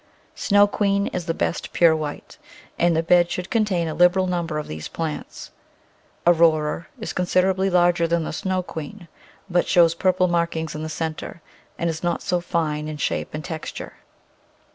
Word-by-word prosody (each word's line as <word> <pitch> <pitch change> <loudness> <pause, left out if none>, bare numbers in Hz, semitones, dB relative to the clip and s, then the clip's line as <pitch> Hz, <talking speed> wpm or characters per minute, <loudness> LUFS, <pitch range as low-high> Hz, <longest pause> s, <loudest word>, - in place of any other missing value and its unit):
Snow 205 0 +4
Queen 200 -1 +1
is 180 -1 -4
the 165 - +1
best - - -2
pure 165 -2 +5
white, 150 -2 -6 0.4
and 170 -1 +3
the 165 - +1
bed 175 +1 +4
should 180 +1 -4
contain 200 -7 +1
a 155 - -3
liberal 180 +2 +4
number 170 -4 -2
of 150 - -4
these 75 0 -6
plants. 160 -2 -6 0.7
Aurora 165 -2 +3
is 220 - -5
considerably 185 +1 +1
larger 175 -2 +3
than 170 0 +1
the - - -5
Snow 185 +2 -1
Queen, 170 +3 -8 0.4
but 175 -2 +1
shows 170 -3 +5
purple 185 +1 +2
markings 170 -2 -1
in 155 - -5
the 155 - -4
centre, 160 +1 -5 0.3
and 170 - -1
is 160 -1 -3
not 175 -1 -1
so 180 - 0
fine 155 -3 -2
in 155 -1 -5
shape 150 - -2
and 155 - -6
texture. 160 -3 -6
170 Hz, 170 wpm, -23 LUFS, 160-180 Hz, 0.7 s, pure